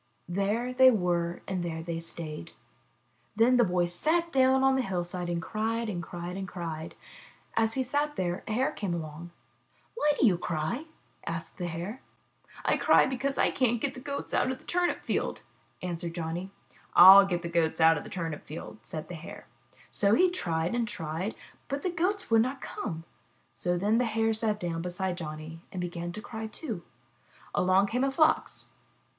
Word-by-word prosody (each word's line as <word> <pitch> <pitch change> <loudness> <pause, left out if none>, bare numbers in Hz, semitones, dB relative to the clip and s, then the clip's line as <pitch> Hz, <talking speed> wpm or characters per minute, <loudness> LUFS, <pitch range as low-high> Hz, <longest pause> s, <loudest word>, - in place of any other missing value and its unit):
There 205 +7 -1
they 260 0 +8
were 175 -6 0
and 185 -2 -2
there 160 -1 -4
they 165 0 -3
stayed. 160 - -5 0.8
Then 235 +3 +5
the 240 - +6
boy 180 -3 +2
sat 320 - +1
down 265 0 +4
on 270 0 +5
the 265 - +2
hillside 180 -4 -3
and 170 -1 -1
cried 225 +5 -2
and 175 -4 -3
cried 175 +2 -6
and 195 -1 -4
cried. 165 -3 -6 0.6
As 225 0 +2
he 265 - +1
sat 290 +3 -1
there 175 -1 -2
a 215 - -2
Hare 255 +4 +1
came 190 -5 -3
along. 160 +1 -6 0.6
Why 300 -10 +2
do - - +5
you 185 -6 +4
cry?*' 175 - -2 0.4
asked - - -5
the 175 - -2
Hare. 175 +9 -5 0.2
' - - -41
' - - -16
I - - +3
cry - - +5
because 270 +2 -2
I - - +3
can' 255 -3 +2
t - - 0
get 270 +4 -2
the 265 - -9
Goats 280 +1 -5
out - - +2
of 260 - -2
the - - -20
turnip 355 0 0
field,'' - - -2 0.4
answered 170 -1 -4
Johnny. 170 +2 -3 0.5
*'/'// 195 +1 +10
get 175 -1 -1
the - - -2
Goats 170 -1 +1
out 165 0 +7
of 150 - -4
the - - -10
turnip 165 -4 -4
field," 130 -8 -8
said 155 +7 -6
the - - -7
Hare. 165 -1 -9 0.5
So 205 +1 +3
he 365 +4 +4
tried 170 - -1
and 235 -2 0
he - - -6
tried, 165 +6 -3 0.3
but 280 +1 -3
the 365 - 0
Goats 365 - -1
would 225 -1 +6
not 260 +3 -1
come. 165 -8 -5 0.6
Then 190 +6 +2
the 250 - +2
Hare 225 0 +1
sat 215 -1 -1
down 170 -3 -2
beside 180 +1 -2
Johnny 155 0 -7
and 185 - -5
began 175 -1 -4
to 215 - -7
cry, 220 -2 -5
too. 220 - -5 0.7
Along 185 +2 +4
came 245 +5 0
a 275 - +3
Fox. 310 +3 +1
190 Hz, 195 wpm, -29 LUFS, 170-245 Hz, 0.8 s, *'/'//